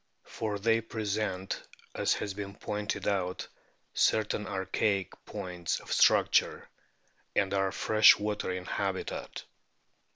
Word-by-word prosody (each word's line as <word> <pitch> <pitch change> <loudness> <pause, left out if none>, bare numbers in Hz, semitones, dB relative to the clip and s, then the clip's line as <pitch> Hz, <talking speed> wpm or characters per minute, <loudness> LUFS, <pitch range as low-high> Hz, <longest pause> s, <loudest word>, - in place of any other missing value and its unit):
For 105 -2 -4
they 115 +2 +2
present, 105 -4 -3 0.3
as - - +1
has 100 - -4
been 100 0 -6
pointed 105 0 -3
out, 95 -3 -1 0.5
certain 105 -1 +1
archaic 95 0 -1
points 90 -4 -3
of - - -5
structure, - - +3 0.7
and 100 -1 +2
are 95 -1 +1
fresh 110 +2 +6
water 105 -2 -2
in 90 0 -4
habitat. 95 -1 -3
100 Hz, 110 wpm, -30 LUFS, 95-105 Hz, 0.7 s, fresh